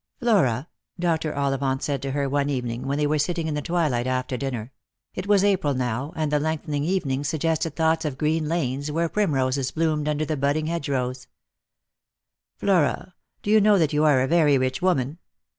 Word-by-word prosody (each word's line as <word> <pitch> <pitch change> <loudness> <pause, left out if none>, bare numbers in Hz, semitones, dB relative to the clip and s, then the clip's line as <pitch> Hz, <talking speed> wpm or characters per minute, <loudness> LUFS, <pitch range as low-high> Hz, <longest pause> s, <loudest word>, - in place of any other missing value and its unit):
" - - -52
Flora," 170 - +2 0.3
Dr. 165 -3 0
Ollivant 135 -1 0
said 140 -4 -1
to 135 - -3
her 140 0 -1
one 140 +1 0
evening, 125 -1 -3
when 140 +1 0
they 150 - +1
were 150 +1 +1
sitting 165 +2 -1
in 155 - -2
the 150 - -2
twilight 145 -7 0
after 130 0 -1
dinner 125 -3 -4 0.2
— - - -60
it 185 +2 -5
was 200 -2 +4
April 185 -8 +2
now, 125 +3 -2
and 155 -2 -1
the 150 - +2
lengthening 150 -1 -2
evenings 145 -6 -1
suggested 160 0 -1
thoughts 160 0 +2
of 145 -4 -3
green 155 +1 0
lanes 145 -3 -1
where 165 +2 0
primroses 135 -9 0
bloomed 155 -2 0
under 150 0 0
the 155 - -2
budding 145 +3 0
hedgerows 135 -6 -2 0.5
— - - -63
" - - -64
Flora, 185 -1 +1 0.3
do 205 - -1
you 215 0 +6
know 210 0 +5
that 160 -5 +1
you 150 +1 +2
are 145 -4 +4
a 130 - +1
very 150 -3 +4
rich 130 0 -1
woman 155 -4 0
150 Hz, 200 wpm, -24 LUFS, 135-165 Hz, 0.5 s, you